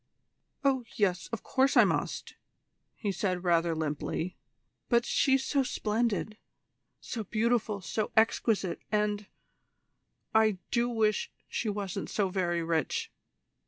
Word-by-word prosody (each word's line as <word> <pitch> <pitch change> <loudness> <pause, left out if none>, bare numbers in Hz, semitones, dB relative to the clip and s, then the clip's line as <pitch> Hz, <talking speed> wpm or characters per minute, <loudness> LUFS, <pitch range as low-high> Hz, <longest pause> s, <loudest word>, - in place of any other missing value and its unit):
"Oh 265 -2 +2
yes, 185 -5 +1
of 230 - -4
course 270 +1 +2
I - - +9
must," - - -2 0.6
he 205 - -2
said 185 -1 -1
rather 170 -2 +2
limply. 160 +3 -2 0.5
"But 235 -1 +4
she's 265 -1 +3
so 280 - +2
splendid 220 -3 -1 0.6
so 225 -3 -5
beautiful, 220 -1 0
so 210 +5 -2
exquisite 220 -4 +2
and 210 -1 0 1.1
I 220 -3 +4
do 240 0 +2
wish 220 -3 +1 0.2
she 225 - -2
wasn't 200 -2 -3
so 200 -3 0
very 175 -3 0
rich. 165 -3 -1
210 Hz, 120 wpm, -30 LUFS, 185-230 Hz, 1.1 s, I